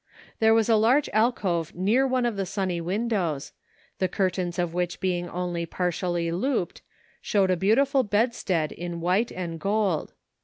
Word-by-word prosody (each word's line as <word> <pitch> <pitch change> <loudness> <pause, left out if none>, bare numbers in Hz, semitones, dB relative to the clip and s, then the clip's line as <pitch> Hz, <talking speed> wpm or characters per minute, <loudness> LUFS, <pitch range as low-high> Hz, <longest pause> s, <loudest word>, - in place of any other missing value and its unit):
There 220 0 +5
was 225 -1 +3
a 225 -2 +4
large 250 +7 +3
alcove 195 -8 +1
near 215 +9 +2
one 255 -1 +1
of 235 -3 0
the 195 -1 -2
sunny 185 -3 -2
windows, 185 -5 -2 0.5
the 185 - +2
curtains 185 -2 -1
of 175 -2 -1
which 180 0 -2
being 175 -2 -1
only 175 -1 -3
partially 175 -1 -1
looped, 190 +1 -1 0.4
showed 195 -3 +2
a - - +3
beautiful 260 - +3
bedstead 205 -7 0
in 175 -1 -5
white 185 +7 +1
and 170 -3 -5
gold. 200 -3 0
185 Hz, 155 wpm, -26 LUFS, 175-220 Hz, 0.5 s, There